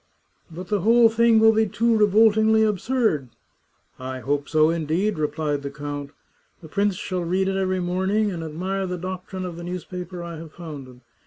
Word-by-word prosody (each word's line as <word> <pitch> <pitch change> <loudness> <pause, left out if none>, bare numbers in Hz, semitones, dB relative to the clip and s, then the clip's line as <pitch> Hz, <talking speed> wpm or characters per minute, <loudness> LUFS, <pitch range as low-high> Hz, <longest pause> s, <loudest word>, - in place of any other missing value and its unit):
*' - - -44
But 180 +2 -8
the 205 -3 0
whole 230 +3 +5
thing 230 0 +4
will 220 0 +6
be 220 0 +2
too 225 +3 +1
revoltingly 220 +1 +4
absurd! 215 - 0 0.2
" - - -44
*' - - -43
I 130 0 -5
hope 145 +1 -2
so, 155 0 +4
indeed," 165 +4 -1
replied 150 -1 -1
the 140 - -5
count. 145 0 -6 0.3
*' - - -41
The - - -9
prince 200 +3 0
shall 180 -1 -3
read 185 +3 0
it 195 - -1
every 185 -1 0
morning, 190 +4 0
and 170 -3 -5
admire 185 +5 -3
the 180 0 -3
doctrine 185 +1 -6
of 175 -2 -6
the 175 - -7
newspaper 180 0 -6
I 170 -1 -7
have 160 -1 -10
founded. 140 -7 -10
180 Hz, 195 wpm, -23 LUFS, 155-210 Hz, 0.3 s, will